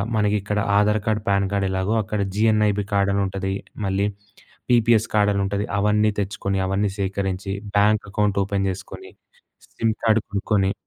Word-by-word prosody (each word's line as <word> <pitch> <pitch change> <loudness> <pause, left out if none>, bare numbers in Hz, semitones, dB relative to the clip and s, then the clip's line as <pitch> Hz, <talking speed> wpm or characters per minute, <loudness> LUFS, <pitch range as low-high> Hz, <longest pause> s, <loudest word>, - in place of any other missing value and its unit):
మనకి 105 -1 +2
ఇక్కడ 105 +1 -2 0.2
Aadhaar 105 +1 +2
card, 110 -1 0
pan 100 0 +2
card 100 -1 +1
ఎలాగో 95 +3 0
అక్కడ 105 +1 -3 0.2
జీఎన్ఐబీ 105 -1 +2
కార్డ్ 100 0 +2
అని 100 - +1
ఉంటది. 95 0 -3 0.3
మళ్ళీ 95 +1 0 0.7
పీపీఎస్ 115 -2 +4
కార్డ్ 105 -1 +4
అని 100 - 0
ఉంటది. 100 +1 -2
అవన్నీ 105 +1 +3
తెచ్చుకొని 100 0 -2
అవన్నీ 100 +1 0
సేకరించి 95 0 -2 0.2
బ్యాంక్ 105 +1 +3
అకౌంట్ 100 -1 +1
ఓపెన్ 100 0 -1
చేసుకొని 380 - -9 0.6
సిమ్ 115 -1 0
కార్డ్ 110 -1 +4
కొనుక్కొని 100 -1 0
100 Hz, 155 wpm, -22 LUFS, 100-105 Hz, 0.7 s, పీపీఎస్